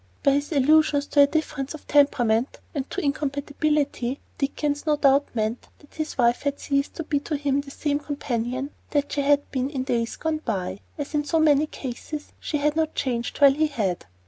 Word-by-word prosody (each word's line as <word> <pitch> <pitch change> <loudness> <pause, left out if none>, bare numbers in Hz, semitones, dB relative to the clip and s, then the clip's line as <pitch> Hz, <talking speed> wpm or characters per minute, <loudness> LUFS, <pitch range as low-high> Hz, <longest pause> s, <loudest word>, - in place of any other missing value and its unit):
By 280 - +5
his 285 +3 0
allusions 295 0 +4
to 285 - +5
a 280 - +7
difference 290 -2 -2
of 305 - -12
temperament 250 -4 +3
and 275 -2 -3
to 390 - -3
incompatibility, 285 -2 -1 0.2
Dickens 290 +2 -1
no 300 - +4
doubt 280 0 +4
meant 220 +2 -2
that 290 - -21
his 310 -1 -4
wife 240 -1 +3
had 285 0 -2
ceased 280 0 -1
to 330 - -4
be 295 -2 0
to 295 +1 -3
him 280 -1 +1
the 280 - -12
same 285 +1 -1
companion 270 -2 -3 0.2
that 285 -1 0
she 285 - 0
had 285 0 +2
been 260 0 -1
in 270 -3 -3
days 235 -3 -1
gone 320 -1 -2
by. 195 -3 -2 0.2
As 290 +1 -5
in 295 -1 +1
so 320 +3 +1
many 305 -1 +4
cases, 295 +3 -7
she 300 - -2
had 295 +1 +1
not 320 -1 0
changed, 240 -3 -2
while 280 -1 +8
he 310 +2 +2
had. 205 - -2
285 Hz, 200 wpm, -25 LUFS, 265-295 Hz, 0.2 s, while